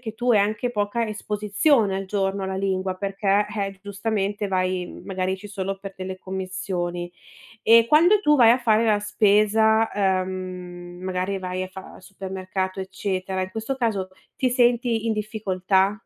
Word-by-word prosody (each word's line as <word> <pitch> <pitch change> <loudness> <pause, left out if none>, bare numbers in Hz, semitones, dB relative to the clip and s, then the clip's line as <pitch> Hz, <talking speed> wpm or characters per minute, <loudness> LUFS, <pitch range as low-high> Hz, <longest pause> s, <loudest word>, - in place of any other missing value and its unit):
che 220 -3 -6
tu 245 +2 0
hai 215 - +5
anche 215 +4 0
poca 210 +1 -1
esposizione 210 +1 +1
al 195 - -3
giorno 195 0 -1
alla 190 0 -3
lingua, 190 -1 -1
perché, 195 +1 -5 0.3
eh 195 -1 -1
g 195 - -21
giustamente 205 0 -2
vai, 185 -1 0 0.2
magari 185 -1 -2
esci 190 +2 -7
solo 195 -1 -3
per 195 -1 -8
delle 185 0 -6
commissioni. 185 -2 -4 0.5
E 230 0 +6
quando 345 - +5
tu 300 -6 +4
vai 235 -3 +7
a 250 - +2
fare 230 -2 +3
la 210 -2 +3
spesa, 215 +1 +3
ehm, 185 -2 -3
magari 185 +1 -2
vai 185 0 -3
a 185 - -8
fa 190 0 -11
al - - -15
supermercato, 190 0 -4
eccetera, 190 0 -3
in 185 - -4
questo 220 +6 -3
caso 220 -7 -1 0.3
ti 255 - +1
senti 240 -2 +2
in 225 - +2
difficoltà? 200 -2 0
195 Hz, 165 wpm, -24 LUFS, 185-220 Hz, 0.5 s, vai